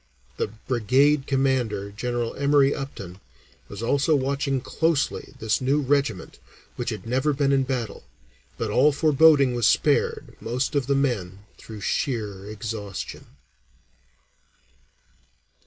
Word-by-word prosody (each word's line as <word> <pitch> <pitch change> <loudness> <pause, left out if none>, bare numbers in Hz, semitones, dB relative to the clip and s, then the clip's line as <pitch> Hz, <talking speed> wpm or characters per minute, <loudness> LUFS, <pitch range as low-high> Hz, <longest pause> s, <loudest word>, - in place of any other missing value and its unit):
'" 60 - -34
The - - 0
brigade 130 +6 +1
commander, 125 -7 0
General 120 +2 -3
Emory 140 0 +3
Upton, 100 -10 -7 0.5
was 100 +2 -7
also 145 +6 +2
watching 140 0 0
closely 145 +1 -1
this 110 -1 0
new 135 +3 +2
regiment 135 -8 -1 0.4
which 120 - -3
had 105 -5 -6
never 130 +5 +1
been 140 0 +1
in 135 -1 +3
battle. 125 -5 -3 0.5
But 110 -2 -2
all 135 +7 +4
foreboding 145 -2 +4
was 120 -2 +2
spared - - +1
most 125 +6 -2
of 140 -3 0
the 140 - +2
men 105 -8 -2
through 110 -2 -10
sheer 105 -6 -2
exhaustion. 105 -2 -6
130 Hz, 125 wpm, -24 LUFS, 110-140 Hz, 0.5 s, all